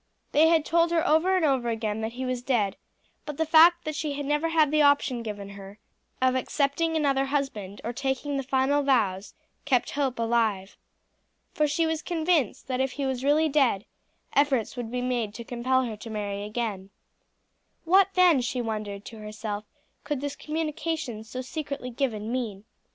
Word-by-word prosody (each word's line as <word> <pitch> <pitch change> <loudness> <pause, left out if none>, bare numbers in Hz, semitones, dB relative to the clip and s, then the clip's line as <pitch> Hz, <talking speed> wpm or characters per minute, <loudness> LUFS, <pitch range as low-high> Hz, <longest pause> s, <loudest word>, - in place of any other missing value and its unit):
They 310 +2 +5
had 325 -2 +3
told 335 +1 +3
her 335 -1 +1
over 330 +5 +3
and 365 -4 +2
over 260 -5 +1
again 220 -1 -2
that 220 +1 -3
he 260 +1 -4
was 255 -1 -2
dead; 225 -7 0 0.5
but 295 -2 -7
the 320 - +1
fact 335 +2 +6
that 310 - -2
she 300 0 -2
had 285 0 -4
never 295 +3 +1
had 315 -3 +3
the 305 0 +3
option 285 -4 +3
given 205 -3 -6
her 200 0 -11 0.4
of 255 0 +3
accepting 285 +5 0
another 275 -3 +2
husband 270 -9 -3
or 235 - -3
taking 270 +3 -2
the 275 - 0
final 270 +2 +1
vows 210 -8 +1 0.3
kept 250 -3 +1
hope 275 -3 -1
alive. 225 -4 0 0.8
For 300 - +2
she 300 +3 +1
was 320 -1 -1
convinced 325 - 0
that 260 0 -1
if 265 -1 -1
he 280 - -3
was 260 -1 -2
really 300 +3 +3
dead, 270 -8 +2 0.5
efforts 275 -6 +2
would 240 -3 -5
be 250 +1 -3
made 240 -4 -1
to 235 - -6
compel 255 +2 0
her 230 -3 -4
to 225 +2 -10
marry 205 -2 -3
again. 210 -3 -4 1.0
What, 375 +3 +5
then, 355 -7 +5
she 245 +1 -2
wondered 215 -3 -4
to 225 - -10
herself, 210 0 -5 0.4
could 295 -3 -2
this 285 +1 -4
communication 305 -6 -3
so 255 +3 -6
secretly 280 -2 -5
given 230 -4 -2
mean? 225 -6 -3
260 Hz, 180 wpm, -27 LUFS, 225-300 Hz, 1.0 s, fact